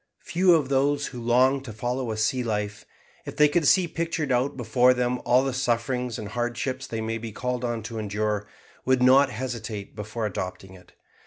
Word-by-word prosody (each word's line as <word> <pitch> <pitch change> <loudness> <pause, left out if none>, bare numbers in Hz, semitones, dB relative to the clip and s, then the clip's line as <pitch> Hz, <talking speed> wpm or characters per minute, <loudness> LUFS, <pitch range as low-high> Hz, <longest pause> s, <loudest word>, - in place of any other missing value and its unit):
Few 180 0 +4
of 145 -5 0
those 140 +1 +2
who 125 -2 -7
long 130 +3 +3
to 130 -4 -8
follow 120 +3 -3
a 110 - -4
sea 120 +4 +1
life, 105 -2 -3 0.4
if - - -8
they 150 - +6
could 150 0 +1
see 185 +2 +5
pictured 165 -3 -2
out 130 +2 +1
before 125 +1 +3
them 125 0 -1
all 125 +2 +4
the 135 -1 -1
sufferings 125 -1 -1
and 105 - -6
hardships 120 +3 -3
they 115 -1 -4
may 115 +1 -3
be 115 0 -6
called 125 +2 -3
on 120 -2 -2
to 115 0 -5
endure, 105 0 -2 0.4
would 130 -1 +2
not 135 +2 +6
hesitate 110 -3 -5
before 110 +2 -4
adopting 95 -1 -5
it. 90 -1 -17
125 Hz, 190 wpm, -25 LUFS, 110-130 Hz, 0.4 s, they